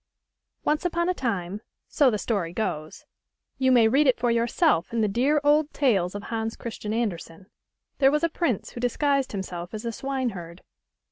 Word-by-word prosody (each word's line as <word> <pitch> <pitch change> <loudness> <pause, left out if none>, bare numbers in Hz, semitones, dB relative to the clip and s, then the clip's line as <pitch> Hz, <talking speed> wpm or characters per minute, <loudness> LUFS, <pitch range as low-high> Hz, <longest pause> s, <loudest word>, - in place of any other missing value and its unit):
ONCE 300 +1 +1
upon 340 0 0
a - - +2
time, 205 - -3 0.3
so 285 -3 +3
the 215 - 0
story 195 -6 -2
goes 155 -7 -4 0.5
(you 260 -1 +3
may 235 -3 +6
read 275 +6 +3
it 255 - +3
for 240 0 +1
yourself 235 - +2
in 230 -1 0
the 215 - +3
dear 260 +9 +2
old 295 +1 +3
tales 200 -10 +2
of 205 - -5
Hans 225 0 -3
Christian 215 -2 -6
Andersen), 190 -5 -4 0.5
there 270 -1 +6
was 300 +3 0
a - - +5
prince 305 - -1
who - - -8
dis 245 -1 -1
guised 280 -3 +1
himself 180 -1 -5
as 215 - -6
a 230 - -1
swineherd. 220 -10 -4
235 Hz, 185 wpm, -25 LUFS, 200-275 Hz, 0.5 s, may